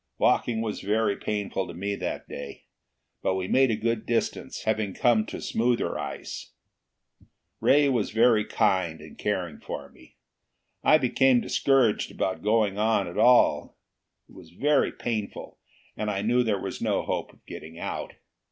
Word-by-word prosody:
Walking 115 -2 +2
was 110 -2 -3
very 105 0 +1
painful 100 -3 -3
to 85 - -9
me 100 +3 -3
that - - -4
day, 70 -1 -8 0.6
but 95 - 0
we 95 -1 -2
made 130 +4 +4
a 110 - +1
good 115 +1 -2
distance, 115 -1 -2
having 110 -3 -1
come 115 -4 +3
to - - -6
smoother 120 +1 0
ice. - - -7 1.1
Ray 145 +1 +4
was 125 -6 +1
very 115 0 +4
kind 95 -7 0
in 75 0 -12
caring 90 -6 -3
for - - -7
me. - - -20 0.7
I 155 - +6
became 130 -2 +3
discouraged 130 -4 +2
about 95 - -2
going 105 -2 +1
on 110 -2 +2
at 85 - -5
all: 125 0 +4 0.5
it - - -20
was - - -14
very 145 +10 +2
painful, 110 -4 -5 0.4
and 105 - -2
I 100 -1 -2
knew 120 +3 +3
there 110 -4 +1
was - - -6
no - - 0
hope - - -3
of - - -27
getting 80 +1 -10
out. - - -5
110 Hz, 160 wpm, -26 LUFS, 100-120 Hz, 1.1 s, I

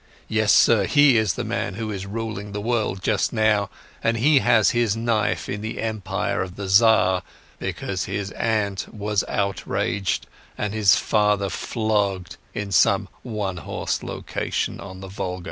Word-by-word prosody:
Yes, 110 -1 +2
sir, 105 -4 +5
he 145 -3 +5
is 110 -6 +2
the - - -3
man 100 - -3
who 110 0 -4
is 100 -1 -5
ruling 105 -1 -5
the 105 - -3
world 110 -4 -1
just 105 -2 +1
now, 110 -3 +2 0.3
and 115 0 +2
he 140 +5 +5
has 110 -4 +4
his 120 -3 +1
knife 115 -2 0
in 105 - -4
the 110 +1 -5
Empire 110 -3 -2
of 90 -1 -5
the 100 -1 -5
Tsar, 95 -3 +5 0.4
because 95 -2 -3
his 100 +1 -4
aunt 105 -4 -1
was 105 -1 -1
outraged 100 -1 -1 0.3
and 105 -1 -2
his 105 -4 +5
father 105 -2 +1
flogged 100 -5 -1 0.2
in 105 -1 -4
some 80 - +3
one 105 -6 -3
horse 80 - -3
location - - -3
on 95 -1 -9
the 95 - -7
Volga." 95 -1 -4
105 Hz, 160 wpm, -23 LUFS, 95-110 Hz, 0.4 s, sir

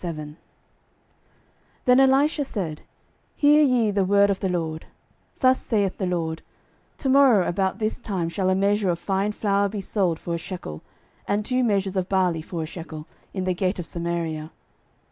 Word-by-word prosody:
12:007:001 155 -4 -6 1.5
Then 250 +1 +6
Elisha 275 +3 +4
said, 180 - -4 0.5
Hear 295 +1 +5
ye 250 -7 +3
the 200 -1 +1
word 200 +1 +4
of 195 - -2
the 190 - -1
LORD; 160 -3 -3 0.5
Thus 260 -1 +3
saith 200 -4 -1
the 190 - -1
LORD, 165 -2 -2 0.6
To 270 - -2
morrow 260 -8 +5
about 190 +2 0
this 215 +2 -2
time 190 -8 -2
shall 185 +2 -1
a 185 - +3
measure 200 0 +2
of 170 - +1
fine 195 +3 -1
flour 200 -1 +1
be 210 +1 -5
sold 190 -4 0
for 170 - -5
a - - 0
shekel, 165 - -7 0.5
and 205 +1 0
two 255 +2 +1
measures 200 -4 0
of 185 0 -1
barley 180 -4 +1
for 165 0 -5
a - - -3
shekel, 155 -2 -8 0.3
in 190 - -3
the 185 0 0
gate 185 +2 -1
of 175 - -5
Samaria. 170 -2 -3
190 Hz, 175 wpm, -24 LUFS, 170-210 Hz, 1.5 s, Then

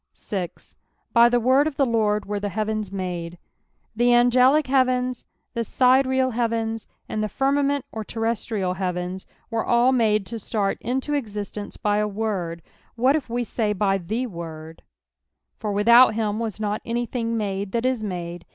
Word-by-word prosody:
8. 180 -4 -1 0.4
" - - -45
By 235 0 +7
(A« 245 - +3
word 260 +5 +4
of 305 - -5
tia 275 - +3
Lord 215 -3 +1
wera 205 0 -3
tlia 205 - -2
lieaveni 215 -1 -2
made." 175 -3 -4 0.6
The 240 +2 +1
angelio 250 +4 +5
heavens, 255 -2 +1 0.3
the 235 -2 -1
sidereal 260 +2 +3
heavens, 225 -1 -1 0.2
and 215 - -2
the 215 - -2
firmament 280 +3 +1
or 220 - -5
terrestrial 225 -4 -2
heavens, 185 0 -4 0.2
were 230 -1 0
all 240 +2 +3
made 215 -5 +2
to 230 +3 -6
start 200 -2 -1
into 265 +5 -2
existence 210 -6 -4
by 210 -2 +1
a 210 0 +1
word; 195 -6 -3 0.3
wliat 255 +4 +4
if 295 -5 -2
we 240 +1 -1
say 215 -2 -1
by 195 -1 +1
the 220 +8 -2
Word, 165 -5 -8 0.4
" - - -55
For 210 - -2
without 230 +3 +6
him 215 -1 -1
was 225 -3 -3
tiot 210 0 -2
anything 235 -1 -2
made 200 -2 -3
that 235 +3 -1
is 255 -4 0
made." 175 -3 -5
225 Hz, 170 wpm, -24 LUFS, 200-245 Hz, 0.6 s, By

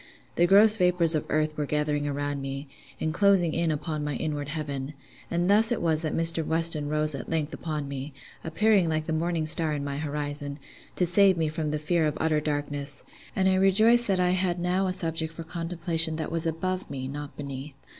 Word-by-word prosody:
The 175 - +2
gross 210 +3 +6
vapours 180 -3 +3
of 155 - -2
earth 155 0 -1
were 150 -1 -3
gathering 150 0 -1
around 145 0 -3
me, 135 +1 -6 0.3
and 155 - -2
closing 190 -3 +3
in 170 0 0
upon 155 0 -3
my 145 -1 -3
inward 145 0 -4
heaven; 145 -2 -5 0.3
and 175 +1 -1
thus 215 +3 +4
it 240 - 0
was 160 -2 0
that 155 - -3
Mr. 165 0 +4
Weston 160 -2 +3
rose 155 0 0
at 135 -3 -7
length 160 -1 -2
upon 150 -1 -5
me, 140 +1 -6 0.3
appearing 195 +1 +1
like 155 -1 -2
the 160 - -3
morning 165 0 -1
star 155 0 +6
in 145 -1 -4
my 140 -1 -4
horizon, 145 -1 -3 0.4
to 180 - +1
save 190 +1 +4
me 160 -2 0
from 155 -1 -3
the 150 - -2
fear 155 +1 0
of 150 - -4
utter 155 -1 +1
darkness; 145 -1 -2 0.3
and 190 -1 +1
I 190 - +3
rejoiced 215 +6 +4
that 190 -2 +1
I 180 0 +2
had 180 -1 -1
now 180 +2 0
a - - -1
subject 165 -2 -1
for 165 - -8
contemplation 165 -1 +1
that 160 0 -5
was 165 0 +1
above 185 +3 -3
me, 130 -1 -6
not 145 +1 -8
beneath. 140 0 -8
160 Hz, 205 wpm, -26 LUFS, 150-175 Hz, 0.4 s, gross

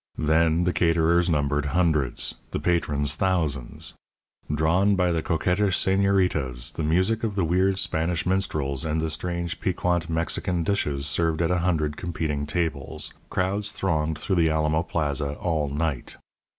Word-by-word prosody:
Then 80 +2 +2
the 90 0 +1
caterers 85 +1 +3
numbered 75 -2 +1
hundreds; 80 -8 +1 0.2
the - - -3
patrons 75 -5 0
thousands. 80 -10 -1 0.6
Drawn 85 +7 +3
by 90 -2 +2
the 85 -1 0
coquettish 90 +4 +1
señoritas, 90 -11 +1
the - - -4
music 95 +9 +1
of 110 -3 -1
the 95 - +1
weird 95 +3 +2
Spanish 80 -2 -1
minstrels, 75 -8 0
and 80 0 -1
the 80 0 -1
strange 85 +1 -3
piquant 90 -2 0
Mexican 85 +1 -1
dishes 75 -7 -1
served 80 +2 0
at 85 0 +1
a 90 - +2
hundred 80 -4 0
competing 75 -4 -3
tables, 80 -3 -3 0.2
crowds 100 +3 0
thronged 80 -4 -1
the 85 -1 +1
Alamo 80 0 +1
Plaza 75 -4 -2
all 80 -4 -1
night. 75 -2 -3
80 Hz, 140 wpm, -25 LUFS, 75-90 Hz, 0.6 s, caterers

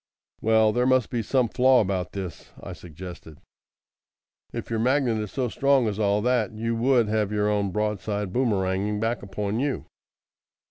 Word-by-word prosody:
"Well, 110 -1 +3
there 125 +1 +1
must 130 -3 +2
be 120 - -1
some 125 +2 +1
flaw 130 +2 +4
about 95 -3 -1
this," 95 -4 -7
I - - -8
suggested. 85 -2 -10 1.1
"If - - -6
your 115 - 0
magnet 125 -1 +2
is 105 -2 -4
so 130 -2 -1
strong 135 0 +2
as 105 -1 -3
all 105 0 +1
that, 120 -4 +1
you 115 +2 -2
would 120 -1 +3
have 105 -1 0
your 105 0 +1
own 105 -1 +1
broadside 105 -1 -2
boomeranging 105 -4 0
back 115 +2 -1
upon 100 +2 -3
you." 140 +1 -2
110 Hz, 160 wpm, -25 LUFS, 100-120 Hz, 1.1 s, flaw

